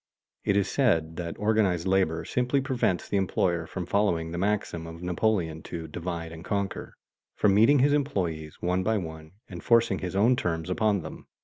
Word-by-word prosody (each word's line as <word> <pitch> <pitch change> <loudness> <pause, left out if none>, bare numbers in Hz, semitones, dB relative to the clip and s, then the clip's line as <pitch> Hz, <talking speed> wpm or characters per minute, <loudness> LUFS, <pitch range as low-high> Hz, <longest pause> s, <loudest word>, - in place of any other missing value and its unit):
It 100 - +2
is 100 -1 +2
said 80 - +1
that 85 -1 -5
organized 105 -5 +1
labor 95 -4 +1
simply 125 +3 +1
prevents 125 -9 0
the 100 - 0
employer 85 -3 0
from 90 0 -5
following 85 -4 0
the 85 - -4
maxim 95 -4 -1
of 85 +1 -9
Napoleon 90 -3 0
to 85 -2 -5
"divide 85 +1 -5
and 85 0 -9
conquer," 100 +1 -3 0.4
from 105 -2 +3
meeting 115 +8 +6
his 140 +2 +4
employees 90 - -2
one 90 +1 +1
by 110 +3 +1
one 80 -3 -7
and 90 -4 -9
forcing 115 -5 +3
his 95 0 -5
own 115 +6 +4
terms 85 -5 -2
upon 105 -2 +1
them. 80 - -9
90 Hz, 180 wpm, -27 LUFS, 85-105 Hz, 0.4 s, meeting